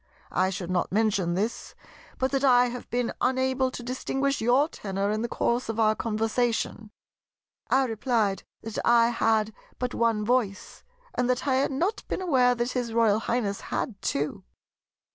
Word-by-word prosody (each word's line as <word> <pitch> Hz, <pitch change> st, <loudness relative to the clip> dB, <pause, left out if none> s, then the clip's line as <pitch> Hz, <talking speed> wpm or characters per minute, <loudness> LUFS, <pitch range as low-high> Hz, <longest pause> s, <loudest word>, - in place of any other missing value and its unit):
I 185 Hz, +1 st, +2 dB
should 185 Hz, -1 st, -4 dB
not 180 Hz, -1 st, 0 dB
mention 200 Hz, -4 st, +1 dB
this, 215 Hz, +5 st, -3 dB, 0.4 s
but 260 Hz, 0 st, 0 dB
that 275 Hz, 0 st, 0 dB
I 245 Hz, -2 st, +5 dB
have 245 Hz, 0 st, -8 dB
been 245 Hz, 0 st, -1 dB
unable 260 Hz, +1 st, +1 dB
to 250 Hz, -, -7 dB
distinguish 270 Hz, +2 st, -1 dB
your 250 Hz, +6 st, +4 dB
tenor 200 Hz, -, -3 dB
in 215 Hz, +1 st, -1 dB
the 235 Hz, -, -1 dB
course 235 Hz, 0 st, 0 dB
of 225 Hz, 0 st, -2 dB
our 215 Hz, -1 st, +4 dB
conversation." 225 Hz, 0 st, -1 dB, 0.8 s
I 265 Hz, 0 st, +4 dB
replied 220 Hz, -3 st, 0 dB, 0.2 s
that 225 Hz, -1 st, -4 dB
I 235 Hz, -1 st, +5 dB
had 220 Hz, -2 st, +1 dB, 0.2 s
but 250 Hz, 0 st, -3 dB
one 225 Hz, -2 st, +1 dB
voice, 230 Hz, -4 st, -1 dB, 0.3 s
and 250 Hz, 0 st, 0 dB
that 250 Hz, 0 st, 0 dB
I 260 Hz, -1 st, +3 dB
had 275 Hz, -, +1 dB
not 350 Hz, +11 st, -1 dB
been -, -, -2 dB
aware 260 Hz, -9 st, +3 dB
that 240 Hz, +1 st, -1 dB
his 245 Hz, -3 st, -2 dB
Royal 220 Hz, -2 st, +4 dB
Highness 220 Hz, -3 st, -1 dB
had 205 Hz, -5 st, -4 dB
two. 140 Hz, -9 st, -2 dB
235 Hz, 165 wpm, -27 LUFS, 215-255 Hz, 0.8 s, I